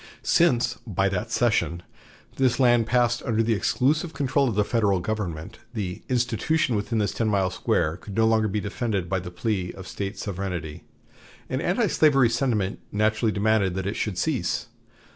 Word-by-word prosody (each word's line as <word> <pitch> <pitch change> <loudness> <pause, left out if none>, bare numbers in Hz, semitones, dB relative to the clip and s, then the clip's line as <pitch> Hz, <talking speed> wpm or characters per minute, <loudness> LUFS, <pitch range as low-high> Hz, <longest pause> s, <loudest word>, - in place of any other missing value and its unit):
Since, 130 -9 +2
by 95 -1 +1
that 100 +4 -3
cession, 110 -8 +1 0.5
this 130 -1 +2
land 120 -3 +4
passed 120 0 +2
under 115 -1 0
the 115 +1 +1
exclusive 150 - +1
control 135 -1 +1
of 110 - -3
the 105 - +3
Federal 105 -4 +1
government, 85 -5 -4 0.2
the 95 -4 -4
"institution" 125 +3 +1
within 105 +3 -1
this 105 -1 +1
ten 115 - -1
miles 95 -3 +1
square 80 +2 0
could 100 +1 -10
no 115 0 +3
longer 110 -1 +3
be 105 +1 -1
defended 105 -3 -2
by 95 +2 0
the 90 0 -7
plea 90 0 -2
of 95 -1 -10
State 100 0 -5
sovereignty, 90 -6 -5 0.7
and - - -1
antislavery 135 -6 +3
sentiment 115 -6 0
naturally 110 +1 +1
demanded 100 -3 +1
that 95 -1 -3
it 100 - -2
should 105 -5 -2
cease. - - -1
110 Hz, 165 wpm, -25 LUFS, 95-120 Hz, 0.7 s, land